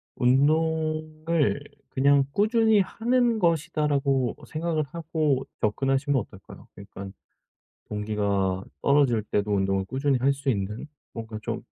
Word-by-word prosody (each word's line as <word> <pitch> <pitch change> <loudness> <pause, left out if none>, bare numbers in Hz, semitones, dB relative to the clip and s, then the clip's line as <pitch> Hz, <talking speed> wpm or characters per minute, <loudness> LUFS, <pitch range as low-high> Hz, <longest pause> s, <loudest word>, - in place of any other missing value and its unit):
운동을 155 +3 +1 0.3
'그냥 140 +1 +4
꾸준히 220 0 +3
하는 235 +3 +1
것이다.'라고 145 - +1
생각을 155 0 -1
하고 155 -5 -1 0.2
접근하시면 135 +5 +1
어떨까요? 100 -1 -13
그러니깐 100 -1 -9 0.8
동기가 100 -3 -1 0.2
떨어질 140 -6 +3
때도 105 0 -1
운동을 95 -1 +1
꾸준히 135 +2 0
할 135 +3 +3
수 140 0 -6
있는 105 +3 -3 0.3
뭔가 110 -1 -6
좀 - - -4
140 Hz, 275 characters per minute, -26 LUFS, 110-155 Hz, 0.8 s, 그냥